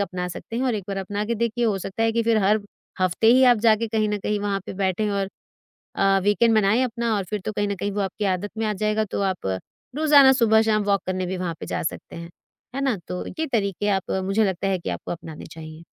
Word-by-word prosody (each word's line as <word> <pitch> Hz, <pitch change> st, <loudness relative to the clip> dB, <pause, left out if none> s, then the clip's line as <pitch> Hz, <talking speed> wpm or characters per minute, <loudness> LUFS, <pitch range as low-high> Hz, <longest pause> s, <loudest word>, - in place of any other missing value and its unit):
अपना 180 Hz, -2 st, -2 dB
सकते 225 Hz, +6 st, -7 dB
हैं 255 Hz, -, -1 dB
और 250 Hz, -3 st, +1 dB
एक 200 Hz, -3 st, -4 dB
बार 195 Hz, -, -3 dB
अपना 205 Hz, +2 st, -3 dB
के 235 Hz, +2 st, -1 dB
देखिए, 235 Hz, +1 st, -1 dB
हो 210 Hz, -4 st, +1 dB
सकता 195 Hz, +4 st, -4 dB
है 225 Hz, 0 st, +2 dB
कि 230 Hz, 0 st, +1 dB
फ़िर 230 Hz, -1 st, +2 dB
हर 210 Hz, +2 st, +3 dB, 0.4 s
हफ्ते 185 Hz, +4 st, +1 dB
ही 260 Hz, +1 st, +6 dB
आप 245 Hz, -2 st, +6 dB
जाके 225 Hz, +1 st, +4 dB
कहीं 215 Hz, -1 st, 0 dB
न 210 Hz, 0 st, -1 dB
कहीं 210 Hz, +1 st, -2 dB
वहाँ 200 Hz, -1 st, -1 dB
पर -, -, -5 dB
बैठें। 195 Hz, +2 st, 0 dB
और 195 Hz, -1 st, -1 dB, 0.7 s
अ, 195 Hz, 0 st, +3 dB
वीकेंड 220 Hz, +3 st, +3 dB
मनाएँ 215 Hz, +4 st, +3 dB
अपना 235 Hz, -1 st, -1 dB
और 195 Hz, -, -1 dB
फ़िर 210 Hz, +3 st, -4 dB
तो 215 Hz, -, -2 dB
कहीं 205 Hz, 0 st, -1 dB
न 200 Hz, -, -1 dB
कहीं 200 Hz, +2 st, -3 dB
वो 205 Hz, -, -2 dB
आपकी 195 Hz, +2 st, -3 dB
आदत 205 Hz, +3 st, -5 dB
में 225 Hz, -, 0 dB
आ 210 Hz, -, 0 dB
जाएगा। 215 Hz, 0 st, +1 dB
तो -, -, -1 dB
आप 135 Hz, -, -1 dB, 0.4 s
रोज़ाना 290 Hz, -3 st, +7 dB
सुबह-शाम 220 Hz, -3 st, +3 dB
वॉक 200 Hz, -1 st, +2 dB
करने 185 Hz, 0 st, -2 dB
भी 185 Hz, +1 st, -3 dB
वहाँ 175 Hz, -2 st, -3 dB
पर -, -, -6 dB
जा -, -, -3 dB
सकते 160 Hz, -, -5 dB
हैं। 170 Hz, 0 st, -8 dB, 0.4 s
है 275 Hz, -, -2 dB
ना? 265 Hz, -6 st, +1 dB
तो 180 Hz, -, -4 dB
ये 320 Hz, 0 st, -3 dB
तरीके 205 Hz, -2 st, 0 dB
आप 195 Hz, -2 st, 0 dB
मुझे 200 Hz, +3 st, +2 dB
लगता 190 Hz, 0 st, -1 dB
है 190 Hz, -1 st, +1 dB
कि -, -, -5 dB
आपको -, -, -5 dB
अपनाने 160 Hz, -2 st, -8 dB
चाहिए। 160 Hz, 0 st, -10 dB
205 Hz, 250 wpm, -23 LUFS, 190-225 Hz, 0.7 s, रोज़ाना